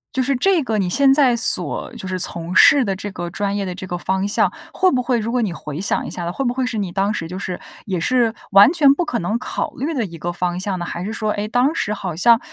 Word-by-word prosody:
就 260 Hz, -, +2 dB
是 275 Hz, -, +1 dB
这 360 Hz, +3 st, +2 dB
个 225 Hz, -4 st, -1 dB
你 190 Hz, -3 st, 0 dB
现 270 Hz, +8 st, +4 dB
在 270 Hz, -4 st, +4 dB
所 230 Hz, -, 0 dB
就 190 Hz, -, -7 dB
是 185 Hz, 0 st, -2 dB
从 170 Hz, +1 st, -5 dB
事 280 Hz, -, +7 dB
的 195 Hz, -, -1 dB
这 200 Hz, +1 st, -6 dB
个 175 Hz, -2 st, -5 dB
专 200 Hz, +2 st, -2 dB
业 200 Hz, -, -2 dB
的 180 Hz, -1 st, -5 dB
这 185 Hz, 0 st, -7 dB
个 175 Hz, -1 st, -4 dB
方 190 Hz, +2 st, -1 dB
向， 205 Hz, -, +2 dB, 0.2 s
会 375 Hz, -, +3 dB
不 255 Hz, -, +1 dB
会 245 Hz, -1 st, +1 dB
如 220 Hz, +1 st, -3 dB
果 250 Hz, -1 st, +1 dB
你 210 Hz, -, -1 dB
回 150 Hz, -2 st, -7 dB
想 -, -, 0 dB
一 -, -, -5 dB
下， 175 Hz, -1 st, -4 dB
会 270 Hz, +8 st, -3 dB
不 240 Hz, -, +1 dB
会 260 Hz, 0 st, -1 dB
是 225 Hz, -2 st, -3 dB
你 200 Hz, -3 st, -2 dB
当 195 Hz, +3 st, 0 dB
时， 165 Hz, -5 st, -4 dB
就 180 Hz, +3 st, -7 dB
是 185 Hz, -2 st, -5 dB, 0.3 s
也 185 Hz, -4 st, -2 dB
是 235 Hz, +3 st, +2 dB, 0.2 s
完 200 Hz, +6 st, +8 dB
全 290 Hz, -5 st, +5 dB
不 355 Hz, -, -1 dB
可 240 Hz, -7 st, -2 dB
能 210 Hz, +6 st, -1 dB
考 -, -, -4 dB
虑 295 Hz, +6 st, -3 dB
的 240 Hz, -6 st, -1 dB
一 165 Hz, -2 st, -9 dB
个 175 Hz, +3 st, -3 dB
方 175 Hz, 0 st, -2 dB
向 185 Hz, 0 st, -3 dB
呢？ 175 Hz, -, -4 dB
还 170 Hz, -, -5 dB
是 210 Hz, -, -4 dB
说， 215 Hz, -1 st, -2 dB
诶， 210 Hz, +1 st, -3 dB
当 250 Hz, +6 st, +2 dB
时 210 Hz, 0 st, -1 dB
好 185 Hz, -5 st, -5 dB
像 230 Hz, +7 st, +5 dB
205 Hz, 305 characters per minute, -20 LUFS, 180-250 Hz, 0.3 s, 完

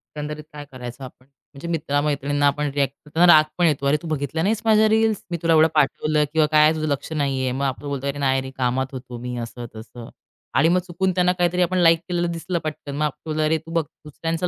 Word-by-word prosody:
एकंदरीत 150 Hz, 0 st, -5 dB
काय 145 Hz, -1 st, -8 dB
करायचं 125 Hz, 0 st, -8 dB
आपण? 130 Hz, 0 st, -12 dB, 0.3 s
म्हणजे 140 Hz, +4 st, -8 dB
मित्रा 150 Hz, -4 st, -1 dB
मैत्रिणींना 145 Hz, -1 st, 0 dB
आपण 145 Hz, +1 st, 0 dB
रिएक्ट 140 Hz, -1 st, 0 dB
करताना 160 Hz, +4 st, +2 dB
राग 155 Hz, -, +7 dB
पण 175 Hz, -, +3 dB
येतो, 145 Hz, -4 st, +1 dB
"अरे 145 Hz, +2 st, +3 dB
तू 170 Hz, -, -7 dB
बघितला 155 Hz, 0 st, -2 dB
नाहीस 210 Hz, +3 st, 0 dB
माझ्या 220 Hz, -1 st, +5 dB
रील्स 220 Hz, -1 st, +2 dB
मी 170 Hz, -, -1 dB
तुला 165 Hz, -1 st, +3 dB
एवढं 160 Hz, 0 st, +6 dB
पाठवलं 150 Hz, +1 st, +2 dB
किंवा 160 Hz, -1 st, +4 dB
काय 155 Hz, 0 st, +6 dB
तुझं 155 Hz, 0 st, -2 dB
लक्ष 140 Hz, +1 st, -3 dB
नाहीये". 135 Hz, -4 st, -1 dB
मग 135 Hz, +2 st, -3 dB
आपण 135 Hz, 0 st, -3 dB
बोलतो 140 Hz, -1 st, -3 dB
"अरे 140 Hz, +1 st, -3 dB
नाही 135 Hz, -1 st, +1 dB
रे, 130 Hz, -, -7 dB
कामात 130 Hz, +1 st, 0 dB
होतो 125 Hz, -2 st, -8 dB
मी," 125 Hz, +1 st, -5 dB
असं 120 Hz, +1 st, -8 dB
तसं 115 Hz, +1 st, -10 dB, 0.5 s
आणि 165 Hz, -, +4 dB
मग 180 Hz, +1 st, +3 dB
चुकून 185 Hz, +2 st, 0 dB
त्यांना 180 Hz, 0 st, +3 dB
काहीतरी 180 Hz, 0 st, 0 dB
आपण 185 Hz, +1 st, +1 dB
लाईक 165 Hz, -2 st, +5 dB
केलेलं 175 Hz, -1 st, 0 dB
दिसलं 170 Hz, +1 st, -3 dB
पटकन. 150 Hz, -2 st, -5 dB
मग 150 Hz, -, -1 dB
आपलं 155 Hz, +1 st, -3 dB
"अ, -, -, +2 dB
रे 160 Hz, -, +2 dB
तू 165 Hz, -, -10 dB
बघ 165 Hz, -1 st, +2 dB, 0.2 s
दुसऱ्यांचं 165 Hz, +3 st, -3 dB
150 Hz, 230 wpm, -22 LUFS, 140-165 Hz, 0.5 s, राग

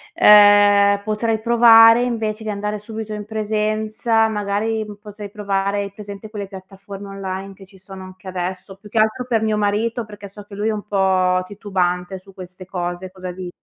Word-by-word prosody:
ehm, 205 Hz, -1 st, +6 dB
potrei 220 Hz, +1 st, -1 dB
provare 230 Hz, 0 st, +7 dB
invece 220 Hz, -3 st, -2 dB
di 215 Hz, -, -4 dB
andare 210 Hz, +1 st, -3 dB
subito 220 Hz, +1 st, -7 dB
in 210 Hz, 0 st, -5 dB
presenza, 215 Hz, +1 st, 0 dB
magari, 215 Hz, +1 st, -2 dB, 0.2 s
potrei 210 Hz, -1 st, -9 dB
provare 200 Hz, -1 st, -1 dB
hai 200 Hz, 0 st, -8 dB
presente 205 Hz, 0 st, -9 dB
quelle 205 Hz, -2 st, -6 dB
piattaforme 195 Hz, +1 st, -11 dB
online 195 Hz, 0 st, -6 dB
che 195 Hz, 0 st, -15 dB
ci 190 Hz, +1 st, -19 dB
sono 190 Hz, 0 st, -11 dB
anche 185 Hz, +1 st, -13 dB
adesso 185 Hz, +1 st, -5 dB
più 210 Hz, +2 st, -16 dB
che 220 Hz, +1 st, -1 dB
altro 220 Hz, +4 st, +1 dB
per 235 Hz, -3 st, 0 dB
mio 215 Hz, -1 st, +1 dB
marito, 210 Hz, +3 st, -1 dB
perché 205 Hz, -1 st, -11 dB
so 205 Hz, +1 st, -12 dB
che 200 Hz, 0 st, -12 dB
lui 210 Hz, +2 st, -2 dB
è 220 Hz, -, +1 dB
un 210 Hz, -1 st, -6 dB
po' 190 Hz, -2 st, +1 dB
titubante 190 Hz, -2 st, -2 dB
su 195 Hz, +1 st, -18 dB
queste 185 Hz, 0 st, -11 dB
cose, 175 Hz, 0 st, -5 dB
cosa 185 Hz, -1 st, -7 dB
di 180 Hz, 0 st, -7 dB
205 Hz, 180 wpm, -20 LUFS, 190-215 Hz, 0.2 s, provare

